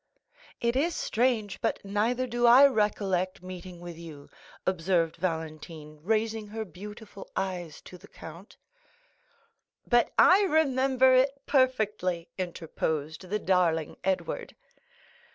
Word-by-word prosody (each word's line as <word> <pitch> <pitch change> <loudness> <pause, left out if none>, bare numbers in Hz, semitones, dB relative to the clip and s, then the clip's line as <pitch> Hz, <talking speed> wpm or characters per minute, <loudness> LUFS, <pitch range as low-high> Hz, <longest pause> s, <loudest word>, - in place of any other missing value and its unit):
"It 235 +1 0
is 320 +5 +1
strange, 225 -4 0
but - - 0
neither 225 +6 0
do 240 -1 +1
I 255 +4 +9
recollect 200 -7 0
meeting 185 -1 -9
with 175 -1 -9
you," 155 -4 -11 0.3
observed 170 -2 0
Valentine, 160 -2 -5
raising 220 +3 -1
her 220 +1 -5
beautiful 205 +3 -11
eyes 180 -5 -4
to 180 - -13
the 200 - -15
count. 170 +5 -12 1.3
30065m - - -24
"But 240 -1 +4
I 375 +3 +7
remember 265 -7 +3
it 270 +2 +3
perfectly," 210 - 0
interposed 160 -2 -4
the 210 - 0
darling 175 -6 +1
Edward. 190 0 -2
195 Hz, 115 wpm, -28 LUFS, 170-240 Hz, 1.3 s, I